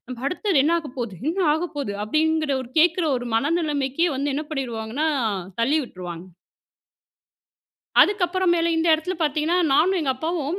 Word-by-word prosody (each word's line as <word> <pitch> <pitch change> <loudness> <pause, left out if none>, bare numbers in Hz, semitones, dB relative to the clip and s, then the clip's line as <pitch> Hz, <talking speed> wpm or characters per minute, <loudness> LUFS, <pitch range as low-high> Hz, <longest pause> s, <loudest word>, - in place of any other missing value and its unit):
நம்ம 255 -2 -7
அடுத்தது 360 0 +1
என்ன 320 +4 +2
ஆகப்போது, 250 - -6
என்ன 345 - -2 0.2
ஆகப்போகுது! 290 -9 -3
அப்படிங்கிற 310 +4 +1
ஒரு 240 - -11
கேக்கிற 345 +2 +3
ஒரு 245 -1 -5
மனநிலைமைக்கே 295 +2 0
வந்து 280 +1 -1
என்ன 300 - -2
பண்ணிருவாங்கனா 255 0 -3 0.5
தள்ளி 280 +7 +2
விட்டுருவாங்க. 180 -4 -8 1.7
அதுக்கப்புற 375 -2 +2
மேல 335 0 +1
இந்த 325 +1 +1
எடத்தில 320 +4 -3
பாத்தீங்கன்னா, 310 +3 +1 0.2
நானும் 365 +6 +3
எங்க 285 -4 0
அப்பாவும் 320 +3 -2
305 Hz, 135 wpm, -23 LUFS, 260-335 Hz, 1.7 s, கேக்கிற